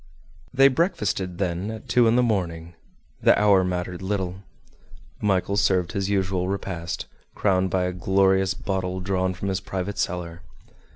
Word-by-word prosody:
They 135 +1 +6
breakfasted 105 - 0
then 90 +1 -2
at 110 0 -8
two 120 -2 +4
in 115 - +3
the 125 - +4
morning; 85 -7 -2 0.5
the - - +5
hour 100 -3 +5
mattered 90 0 -3
little. 95 -1 -3 0.8
Michel 100 -1 +1
served 90 -3 +2
his 100 0 -2
usual 95 -2 0
repast, 95 -3 -4 0.3
crowned 95 -2 +1
by 95 -1 +1
a 90 0 -1
glorious 95 +1 +2
bottle 95 -1 -3
drawn 95 0 -1
from 100 +2 -4
his 95 -1 -1
private 95 +1 -4
cellar. 85 -1 -3
95 Hz, 150 wpm, -24 LUFS, 90-100 Hz, 0.8 s, They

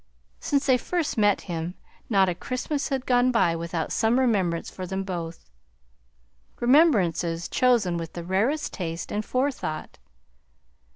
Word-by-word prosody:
Since 280 -1 0
they 255 -2 +4
first 345 +3 -2
met 205 -2 +3
him 170 0 -4 0.3
not 195 -4 +4
a 180 - +1
Christmas 255 - -3
had 270 -2 -2
gone 245 0 +3
by 175 -8 +2
without 165 0 -3
some 225 +2 +2
remembrance 190 -10 +1
for 185 -1 -7
them 190 +1 -3
both; 170 - -6 1.1
remembrances 185 - +3
chosen 235 -9 +2
with 165 -1 -6
the 170 - -6
rarest 220 - 0
taste 165 -2 -5
and 210 - -1
forethought. 255 - -3
195 Hz, 135 wpm, -25 LUFS, 170-255 Hz, 1.1 s, they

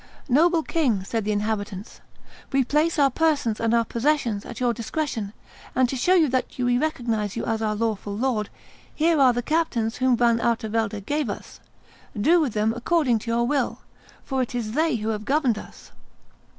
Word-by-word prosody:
"Noble 325 +5 +3
king," 255 - 0
said 220 +2 -3
the 210 - 0
inhabitants, 205 -1 -3 0.5
"we 270 -1 +3
place 305 +6 +1
our 280 -2 +4
persons 285 -7 +1
and 230 0 +1
our 230 0 +3
possessions 235 -4 0
at 235 - -8
your 245 -1 +1
discretion, 230 -2 -3 0.4
and 255 -1 +4
to 270 - -3
show 360 +9 +3
you 330 -4 +4
that 255 0 0
we 245 -1 +1
recognize 230 -9 -1
you 230 - -3
as 225 -1 -1
our 215 -1 0
lawful 210 -2 -2
lord, 230 -4 -1 0.5
here 320 0 +2
are 260 -2 +6
the 245 0 -2
captains 250 -8 0
whom 255 -1 +2
Van 235 -1 +3
Artevelde 220 -2 -1
gave 290 +4 -2
us; - - -7 0.6
do 330 +11 +4
with 270 -8 -1
them 215 +1 +1
according 250 -2 +1
to 230 - -7
your 235 +1 +1
will, 270 0 -1 0.4
for 265 -1 -1
it 250 0 -3
is 225 -3 -2
they 315 +3 +1
who 220 -1 -2
have 215 -1 -2
governed 265 -4 +1
us." - - -13
240 Hz, 185 wpm, -24 LUFS, 220-285 Hz, 0.6 s, are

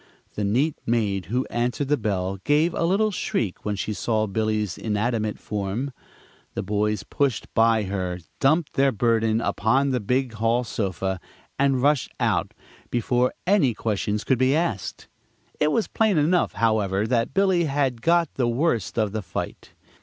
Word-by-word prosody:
The 105 - -3
neat 130 +10 +1
maid 105 -5 0
who 125 +6 0
answered 120 +4 -1
the 150 - +3
bell 95 -5 -2
gave 150 - +2
a - - 0
little 205 +5 +2
shriek 110 - -2
when 105 -1 -1
she 105 +2 -3
saw 110 0 0
Billy's 110 -2 -1
inanimate 110 0 -1
form. 105 +7 -3 0.6
The - - -2
boys 105 0 0
pushed 140 -6 -1
by 115 -1 +4
her, 95 -2 -3 0.2
dumped 155 +3 +2
their 135 0 +3
burden 115 -1 +1
upon 135 +7 +1
the 125 - +1
big 125 +3 0
hall 115 +2 +1
sofa, 95 -4 -2 0.4
and 135 -2 +2
rushed 145 -2 +2
out - - 0 0.3
before 125 +1 +1
any 180 - +3
questions 105 -1 -1
could 130 -3 +1
be 130 +2 +3
asked. 155 - -2 0.5
It 150 0 +3
was 225 - +1
plain 220 -5 +2
enough, 165 +4 +2
however, 105 -3 +1
that 115 0 0
Billy 190 -3 +3
had 135 -5 0
got 170 0 +2
the 125 -3 0
worst 120 - 0
of 110 -3 +1
the 110 +1 -3
fight. 85 -3 -6
115 Hz, 160 wpm, -24 LUFS, 105-140 Hz, 0.6 s, by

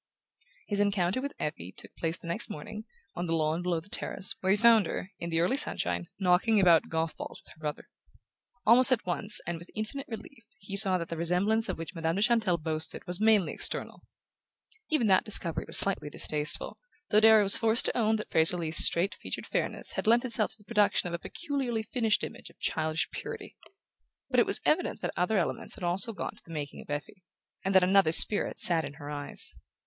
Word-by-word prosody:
His 205 -1 -2
encounter 200 +2 0
with 280 +1 -5
Effie 95 - -5
took - - -13
place 165 0 -3
the - - -16
next 170 - 0
morning, 215 +8 -8 0.3
on 175 0 -5
the 165 - 0
lawn 160 +1 -1
below 175 -2 -1
the 165 - -17
terrace, 195 -1 -1
where 190 - -1
he 200 - +4
found 230 -1 +4
her, 190 - -6
in 170 - -5
the 165 -1 -1
early 180 +11 +1
sunshine, 85 - -2
knocking 195 +4 +2
about 175 -4 +4
golf 160 0 -2
balls - - -9
with - - -15
her - - -26
brother. 150 -1 -6 0.8
Almost 250 +4 +5
at 255 - +1
once, 205 +4 0
and 175 -1 -5
with 170 - -14
infinite 220 +6 -5
relief, 230 +2 -10
he 195 -1 -8
saw 195 -2 +6
that 170 -1 -6
the 165 - -5
resemblance 195 +7 0
of - - -3
which 165 +2 -8
Madame 165 -1 -2
de 200 - +1
Chantelle 220 -7 +2
boasted 155 0 -3
was 180 +3 -6
mainly 215 -4 +3
external. - - -3 0.9
Even 305 -7 +1
that 190 -3 +3
discovery 185 -6 -2
was - - -2
slightly 195 -6 -1
distasteful, 150 0 -2 0.3
though 210 - +5
Darrow 220 -1 +6
was 195 - +7
forced 225 +1 +2
to - - +1
own 220 -2 +1
that 215 - -6
Fraser 160 +2 +2
Leath's 165 -1 +3
straight 175 +4 +1
featured - - -7
fairness - - -2
had - - -4
lent 235 +3 +3
itself 235 -4 +2
to - - -8
the 210 - -21
production 210 -4 +1
of - - -8
a 170 - -3
peculiarly 270 - -4
finished 225 -1 0
image - - -8
of - - -22
childish 160 0 -2
purity. - - -8 0.8
But - - +3
it - - +3
was - - -2
evident - - 0
that - - -4
other 180 +4 0
elements 175 - -1
had - - -11
also 180 +6 0
gone 200 - -6
to - - -16
the - - -22
making 150 -3 -6
of - - -17
Effie, 145 +6 -6 0.4
and 195 0 -2
that 190 - +6
another 190 -3 +3
spirit 205 +5 +8
sat 165 -2 +5
in 145 -1 -7
her 145 -1 -9
eyes. 145 -1 0
185 Hz, 215 wpm, -28 LUFS, 165-220 Hz, 0.9 s, spirit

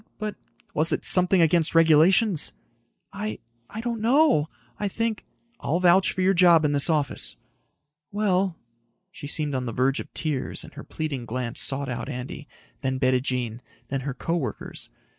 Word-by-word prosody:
but...." 215 -1 -4 0.4
"Was 155 +2 +3
it - - -1
something 180 -1 +5
against 165 0 +2
regulations?" 165 +4 +4 0.6
"I... 210 +2 -4 0.3
I 220 - -6
don't 235 -2 -3
know. 245 - +3 0.3
I 205 - -1
think...." 225 +2 -3 0.3
"I'll 165 +4 -1
vouch 185 +1 +4
for 185 - -3
your 190 +1 +3
job 170 -3 +5
in 145 - +2
this 145 +3 +3
office." 150 -3 -1 0.7
"Well...." 195 -3 0 0.5
She 145 - -9
seemed 150 0 -2
on 130 -1 -2
the 115 - -4
verge 130 +3 +1
of - - -8
tears 150 -5 -2
and - - -13
her - - -9
pleading 140 -6 -5
glance 120 0 -3
sought 140 0 -1
out 120 -3 -4
Andy, 125 +4 -7 0.3
then 130 -2 -1
Bettijean, 125 -3 0 0.3
then 135 -1 -2
her 135 -1 -4
co 165 +6 -2
workers. 130 -11 -5
155 Hz, 160 wpm, -25 LUFS, 135-190 Hz, 0.7 s, something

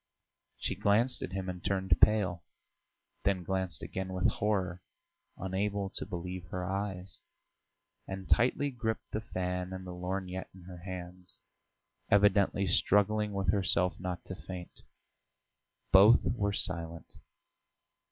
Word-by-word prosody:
She - - -2
glanced 115 +5 +3
at 95 - -5
him 95 -1 -3
and 90 -1 -5
turned 95 -1 +2
pale, 100 -4 +4 0.8
then 95 +1 +1
glanced 95 -1 -2
again 95 0 -4
with 90 -1 +2
horror, 95 -4 -1 0.6
unable 100 +1 -1
to - - -5
believe 90 -1 -5
her 90 +2 -4
eyes, 95 -1 -4 0.9
and 95 -1 -6
tightly 135 +4 +3
gripped 110 -3 -3
the 110 - -2
fan 90 -3 -3
and 95 0 -6
the 90 - -6
lorgnette 90 +1 -4
in 95 - -13
her 90 0 -10
hands, 90 0 -8 0.7
evidently 100 -1 +4
struggling 105 +3 +3
with 95 -2 +1
herself 90 -2 +1
not 90 -1 -4
to - - -6
faint. 90 -1 -9 1.1
Both 105 +5 +8
were 100 -4 0
silent. 85 -4 -4
95 Hz, 125 wpm, -31 LUFS, 90-100 Hz, 1.1 s, Both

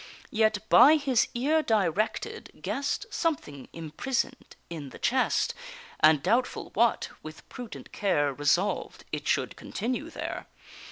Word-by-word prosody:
Yet, 215 -1 +1
by 300 +3 +8
his 270 -6 +2
ear 295 +6 +2
directed, 215 - -1
guess'd 280 +9 -2
Something 200 - -2
imprison'd 235 - -3
in 155 -5 -7
the - - -11
chest, 260 +1 +1 0.5
And, 155 -2 +5
doubtful 235 +7 0
what, 230 +1 +2
with 155 0 -11
prudent 245 -4 -9
care 145 -8 +1
Resolved 160 +8 0
it - - -4
should - - 0
continue 250 +8 -4
there. - - -5
220 Hz, 120 wpm, -28 LUFS, 160-260 Hz, 0.5 s, by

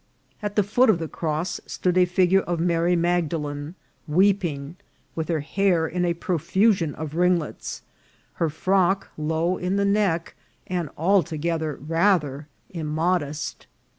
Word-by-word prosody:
At 205 -1 -3
the 210 - +4
foot 230 +6 +3
of 210 - +5
the 165 -1 -4
cross 160 +3 -3
stood 180 -1 -1
a 180 0 +5
figure 180 +1 +3
of 175 -3 -2
Mary 170 +1 +2
Magdalen 165 -3 -1 0.3
weeping, 170 -4 +1 0.4
with 160 -1 -3
her 160 -3 0
hair 175 +1 +1
in 180 +2 -1
a 170 -1 0
profusion 180 0 +1
of 155 -1 -6
ringlets, 175 -2 0 0.6
her 165 - +3
frock 190 +4 +1
low 160 +4 0
in 180 +2 -1
the 200 0 +2
neck, 200 -5 +1 0.3
and 175 -4 -2
altogether 160 -3 +1
rather 155 -2 +1 0.2
immodest. 155 -2 -2
170 Hz, 135 wpm, -24 LUFS, 155-185 Hz, 0.6 s, of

